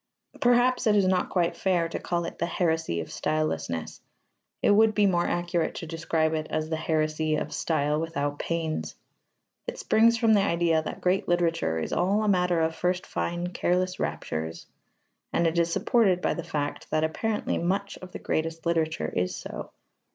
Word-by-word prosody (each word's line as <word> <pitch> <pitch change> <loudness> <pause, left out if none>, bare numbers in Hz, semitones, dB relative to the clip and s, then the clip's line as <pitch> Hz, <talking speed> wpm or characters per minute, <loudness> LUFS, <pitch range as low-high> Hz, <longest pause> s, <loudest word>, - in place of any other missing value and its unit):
Perhaps 245 0 +3
it 210 - +4
is 200 -2 +4
not 185 -1 +1
quite 175 -2 +1
fair 180 -3 +1
to 165 - -4
call 170 -1 -2
it - - -7
the 170 - 0
heresy 160 - 0
of 80 - -8
stylelessness: 85 - -2 0.6
it - - +5
would 215 +1 +5
be 210 - +4
more 175 -3 +2
accurate 175 -1 -1
to - - -5
describe 160 0 0
it 155 -1 -2
as 155 +1 -2
the - - +1
heresy 155 -1 0
of - - -3
style 150 -1 0
without 145 -3 -2
pains. 165 -2 -2 0.7
It - - -4
springs 230 +1 +4
from 225 -1 +4
the 205 - +5
idea 170 -4 +2
that - - -6
great 185 +1 +1
literature 165 - +1
is 80 - -3
all 200 +4 +2
a - - 0
matter 180 -3 +2
of 160 0 +1
first 180 +1 -1
fine 175 +1 -2
careless 180 +1 0
raptures, 80 +1 -3 0.7
and 170 - +1
it 165 +1 +2
is 170 0 +1
supported 195 -2 +3
by - - 0
the 170 - -5
fact 150 -4 -4
that 155 0 +1
apparently 210 +7 -1
much 195 +3 -2
of 185 0 -10
the - - -6
greatest 165 +1 -2
literature 160 -1 0
is 90 0 0
so. - - -7
170 Hz, 180 wpm, -27 LUFS, 155-185 Hz, 0.7 s, it